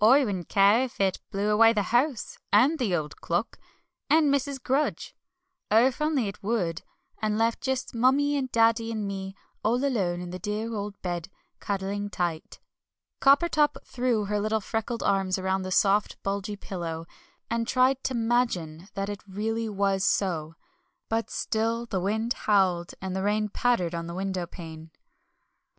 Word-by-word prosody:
I 265 +5 +7
wouldn't 190 -6 -4
care 200 +4 +5
if 255 - -11
it 190 -2 +1
blew 205 +2 0
away 225 +2 +6
the 210 -2 +1
house, 245 -3 +1
and 265 +10 +4
the 210 -8 +1
old 150 -3 -4
clock, - - -2 0.5
and 300 -1 +4
Mrs. 280 0 -1
Grudge. 270 +4 -1 0.5
Oh, 225 +3 +6
if 260 +2 0
only 300 -7 +1
it 195 - -7
would 190 -6 -1 0.4
and 215 -1 0
left 230 +2 +1
just 265 -1 -2
Mummie 270 +5 +3
and 260 -3 -2
Daddy 230 0 +3
and 215 -2 -2
me, 195 -1 -5 0.3
all 245 +5 +2
alone 190 -10 0
in 175 0 -6
the 185 - -6
dear 210 +4 -3
old 205 -1 -5
bed, 175 -1 -3 0.3
cuddling 200 +1 -3
tight." 175 -5 -3 0.6
Coppertop 295 +2 +4
threw 240 -4 0
her 210 +1 -1
little 215 +1 0
freckled 225 +2 -3
arms 195 -1 +1
round 190 0 -1
the 185 - -5
soft, 200 +2 +2
bulgy 200 +1 -2
pillow, 170 -5 -5 0.4
and 230 0 -1
tried 255 +1 +3
to 260 - 0
"'magine" 225 -9 0
that 195 0 -2
it 205 -1 -5
really 220 +3 -2
was 195 -1 0
so; 165 -7 0 0.5
but 225 0 -1
still 230 +2 -1
the 200 -5 -2
wind 220 +5 0
howled, 185 -4 +1
and 190 -1 -3
the 190 - -1
rain 210 +1 +1
pattered 205 -6 +1
on 170 0 -4
the 170 - -6
windowpane. 175 -4 -5
210 Hz, 165 wpm, -27 LUFS, 190-235 Hz, 0.6 s, I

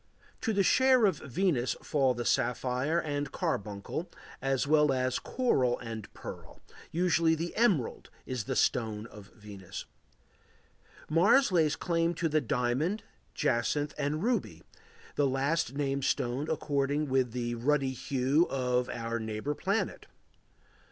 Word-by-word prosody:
To 225 - 0
the 200 -2 +2
share 260 +2 +5
of 185 -7 +1
Venus 140 -3 0
fall 135 -4 +2
the 120 0 -4
sapphire 130 +6 +1
and 145 -3 -3
carbuncle 105 - -3 0.3
as 135 0 +1
well 150 0 +4
as 130 -1 0
coral 130 - +1
and 115 -3 -7
pearl; - - -9 0.3
usually 170 -1 +3
the 165 +2 -4
emerald 200 - +1 0.2
is 125 -5 -3
the - - -2
stone 110 -3 +1
of 105 -3 -12
Venus. 100 -4 -9 1.2
Mars 200 - +4
lays 160 -4 +3
claim 170 -1 0
to 165 +1 0
the 155 0 +2
diamond, 130 - 0 0.3
jacinth, 140 +5 0
and 150 +3 -2
ruby, 245 +1 -1 0.5
the 145 - +3
last 135 +1 0
named 140 -1 -1
stone 130 +5 -1
according 145 -1 0
with 130 -2 +1
the 120 0 -2
ruddy 135 +2 +1
hue 135 +5 +1
of 125 -2 0
our 115 0 -3
neighbor 110 +5 -3
planet. 195 +8 -2
140 Hz, 130 wpm, -30 LUFS, 125-165 Hz, 1.2 s, share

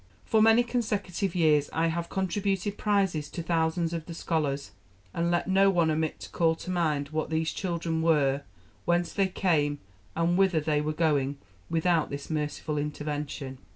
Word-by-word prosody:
For 220 -1 +3
many 225 +2 +6
consecutive 205 -6 -2
years 150 -4 +3
I 165 +1 +1
have 170 +1 -3
contributed 195 +1 -1
prizes 195 -9 0
to 170 - -5
thousands 165 0 0
of 165 -2 -4
the 170 - -7
scholars; 150 -5 -1 0.4
and 170 0 0
let 175 0 +1
no 195 +1 +5
one 170 -4 +2
omit 155 0 -1
to - - -8
call 165 -1 +2
to 180 - -6
mind 155 -5 0
what 155 0 -2
these 160 0 0
children 170 -3 -2
were, 145 -4 +3 0.4
whence 175 0 +1
they 195 -1 +2
came, 155 -6 +1 0.4
and 170 +2 +1
whither 190 -4 +4
they 150 -1 0
were 150 +1 -1
going 145 -3 +1 0.3
without 165 0 +2
this 140 +2 -6
merciful 150 0 -2
intervention. 145 -2 -4
165 Hz, 165 wpm, -28 LUFS, 150-180 Hz, 0.4 s, many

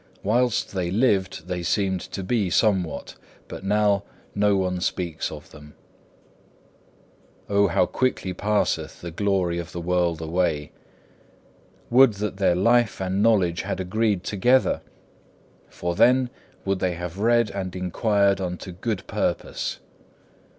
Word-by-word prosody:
Whilst 120 +2 +1
they 90 -3 -1
lived 95 -5 +1
they 90 -1 -3
seemed 95 0 0
to 95 - -6
be 100 -1 0
somewhat, 95 -4 +1 0.3
but - - -8
now 100 0 +2 0.3
no 105 -1 +2
one 90 -1 -1
speaks 85 -3 -2
of 75 -1 -10
them. 75 -1 -14 1.7
6. - - -32
Oh 100 0 +4
how 90 - +2
quickly 125 -7 -1
passeth 105 +3 -1
the 85 - -6
glory 90 -2 0
of 85 0 -7
the 85 - -4
world 85 -1 0
away! 80 -2 -1 1.2
Would 130 -1 +7
that 100 -1 -4
their 95 -3 +3
life 115 +2 +3
and 95 +1 -1
knowledge 95 -6 +3
had 95 0 -4
agreed 100 +1 0
together! 125 +7 +2 0.9
For 85 0 -3
then 125 +6 +4 0.3
would 95 -1 0
they 90 -2 0
have 90 +2 -6
read 115 +1 +3
and 95 -2 -5
inquired 100 +2 +1
unto 90 0 -5
good 95 +2 -4
purpose. - - -2
95 Hz, 135 wpm, -24 LUFS, 90-105 Hz, 1.7 s, Would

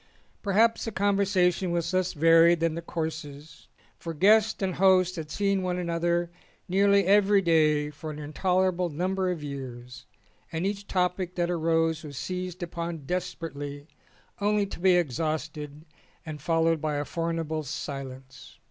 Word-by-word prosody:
Perhaps 220 +3 +2
the 225 - -3
conversation 195 -3 +1
was 170 0 -1
less 185 -1 +1
varied 165 +1 +5
than 165 -1 +1
the 170 - -4
courses, 160 -3 -6 0.3
for 165 -1 -6
guests 215 +6 +4
and 185 -1 0
hosts 185 0 +4
had 160 -3 -6
seen 195 +3 0
one 180 -1 -1
another 170 0 -1 0.4
nearly 200 +1 +3
every 200 +1 +5
day 155 -4 +2
for 155 +2 -8
an 150 - -6
intolerable 180 +4 0
num 180 +5 -2
ber 190 -1 0
of 170 -4 -3
years 125 -3 -8 0.4
and 165 +3 -2
each 200 0 -3
topic 180 0 -1
that 175 0 0
arose 165 -1 +1
was 145 -3 -8
seized 180 +4 -4
upon 170 -3 -5
desperately 145 -5 -5 0.5
only 205 0 +2
to 195 - -8
be 185 0 +4
exhausted 155 -1 -2 0.4
and 155 -2 -7
fol 165 +1 +1
lowed 165 -2 +2
by 155 -2 -1
a 145 0 -2
formidable 165 -1 -2
silence. 135 -2 -7
170 Hz, 150 wpm, -27 LUFS, 155-185 Hz, 0.5 s, varied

